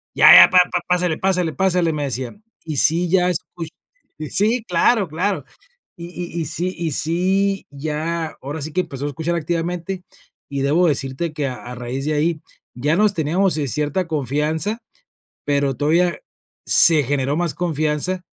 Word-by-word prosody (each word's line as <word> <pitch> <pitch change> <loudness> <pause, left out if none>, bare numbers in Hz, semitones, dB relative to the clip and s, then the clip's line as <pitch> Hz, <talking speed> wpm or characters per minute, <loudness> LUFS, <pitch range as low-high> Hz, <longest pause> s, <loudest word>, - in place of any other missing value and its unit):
"Ya - - +8
ya, - - +10
pa 185 - +5
pa 180 - 0
pásele, 180 -2 +1
pásele, 180 -3 0
pásele", 180 -3 +1
me 150 - -3
decía. 130 - -4 0.3
"Y 155 -3 -4
sí, 170 +5 +2
ya 180 0 +3
escucho, 165 -1 -4 0.6
sí, 220 +4 +1
claro, 190 +4 +2
claro". 185 +6 -2 0.5
Y 170 -1 -8 0.3
y 165 - -1
y - - -3
sí 180 +5 -3
y 165 -3 -3
sí, 190 +6 0
ya 155 +3 -4
ahora 145 +2 -5
sí 155 - -6
que 185 - +1
empezó 140 -4 -7
a - - -1
escuchar 160 +4 -3
activamente, 175 +3 -3 0.5
y 140 -1 -2
debo 165 +6 +3
decirte 140 +2 -2
que 150 -2 -2
a 125 - -5
a 125 +1 -9
raíz 125 +4 -5
de 155 - 0
ahí 155 +1 0 0.3
ya 145 +6 0
nos 210 +1 +3
teníamos, 170 +2 +1
eh, 145 -3 -2
cierta 150 +6 -1
confianza, 155 - -1 0.6
pero 140 -2 0
todavía 170 +4 +1 0.5
se 160 -3 +6
generó 140 +2 -1
más 175 -2 0
confianza 160 +1 -1
160 Hz, 165 wpm, -20 LUFS, 145-180 Hz, 0.6 s, ya